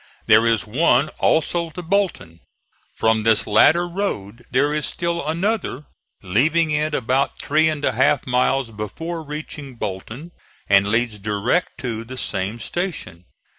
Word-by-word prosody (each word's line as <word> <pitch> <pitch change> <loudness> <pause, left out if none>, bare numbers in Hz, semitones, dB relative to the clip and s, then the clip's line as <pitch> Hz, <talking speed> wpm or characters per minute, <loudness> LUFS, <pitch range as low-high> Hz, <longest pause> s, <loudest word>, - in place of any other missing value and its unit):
There 110 +2 +5
is 115 -2 +1
one 135 +4 +2
also 170 +1 +1
to 175 +3 -8
Bolton. 170 - -1 0.6
From 110 0 +2
this 110 0 +2
latter 160 +11 +4
road 120 - -4
there 140 +4 +2
is 150 -1 -1
still 170 0 -2
another, 170 - -2 0.4
leaving 155 - +2
it 150 0 0
about 130 +3 0
three 155 +2 +2
and 150 -2 -2
a - - +2
half 130 +4 +2
miles 125 0 +1
before 160 - -5
reaching 150 -3 -7
Bolton 115 - -6 0.4
and 100 0 +4
leads 115 0 0
direct 105 - -1
to 115 -4 -3
the 130 +3 -9
same 100 -1 -2
station. 150 - -5
130 Hz, 140 wpm, -21 LUFS, 110-160 Hz, 0.6 s, There